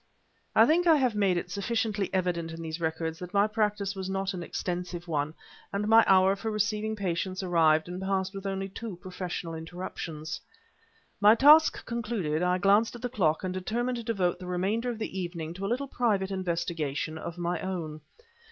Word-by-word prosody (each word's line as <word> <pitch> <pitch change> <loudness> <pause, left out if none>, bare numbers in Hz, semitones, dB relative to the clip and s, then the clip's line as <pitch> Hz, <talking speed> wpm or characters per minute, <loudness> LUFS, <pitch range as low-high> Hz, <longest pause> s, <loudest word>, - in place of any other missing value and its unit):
I - - +8
think 345 +3 +3
I 325 - +7
have 255 -5 +2
made 200 -4 +2
it 175 - -4
sufficiently 205 0 -1
evident 175 -3 -1
in 165 0 -7
these 160 +1 -5
records 160 0 -2
that 180 +2 -8
my 200 +1 +5
practice 210 -2 0
was 190 -1 -4
not 195 0 -1
an 180 - -5
extensive 175 0 -4
one, 150 -1 -1 0.4
and 200 +1 -1
my 225 +1 +7
hour 190 0 +5
for 220 +3 -4
receiving 215 +1 -1
patients 185 -1 -2
arrived 160 -3 +3
and 180 +1 -6
passed 190 0 -1
with 195 0 -5
only 195 0 -2
two 210 +1 -7
professional 180 -2 -5
interruptions. 160 -1 -6 0.8
My 210 +2 +7
task 300 +5 +6
concluded, 215 -10 -2
I 180 0 +2
glanced 205 +5 +3
at 240 - -10
the 245 - -1
clock, 170 -10 +1
and 185 -1 -2
determined 240 +7 -2
to 235 - -5
devote 190 -6 0
the 180 - -8
remainder 195 +7 0
of 235 - -3
the 215 -3 -4
evening 170 -3 -4
to 195 +2 -4
a - - -2
little 260 +4 -1
private 205 -7 0
investigation 170 -4 -2
of 170 +2 -6
my 175 0 -1
own. 165 -5 -4
190 Hz, 190 wpm, -28 LUFS, 170-215 Hz, 0.8 s, I